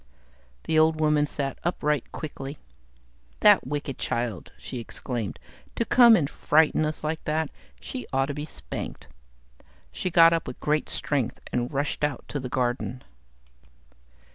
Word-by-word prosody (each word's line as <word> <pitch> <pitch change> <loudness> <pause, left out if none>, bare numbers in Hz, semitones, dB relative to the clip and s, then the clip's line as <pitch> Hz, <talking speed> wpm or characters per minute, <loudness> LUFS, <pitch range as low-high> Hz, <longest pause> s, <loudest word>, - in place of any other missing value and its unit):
The 160 -1 +2
old 160 0 +4
woman 150 -1 +3
sat 140 -2 -3
upright 150 -5 0
quickly. 145 -2 -6 0.8
"That - - +6
wicked 145 -2 -4
child!" 120 -5 -3
she 125 - -6
exclaimed. 115 - -4 0.4
"To 230 - 0
come 240 -2 +7
and 150 -9 +2
frighten 155 +1 +3
us 155 0 -4
like 160 +1 -2
that. 155 0 0 0.3
She 255 - -6
ought 135 0 +2
to 145 - -4
be 145 +1 -4
spanked." - - -7 0.9
She 185 - -3
got 165 -1 +7
up 165 -2 -1
with 125 - -7
great 150 0 0
strength 135 -5 -1
and 120 0 -1
rushed 145 +2 -2
out 145 -4 -1
to 145 - -3
the 130 -1 -5
garden. 125 0 -1
145 Hz, 145 wpm, -26 LUFS, 130-155 Hz, 0.9 s, come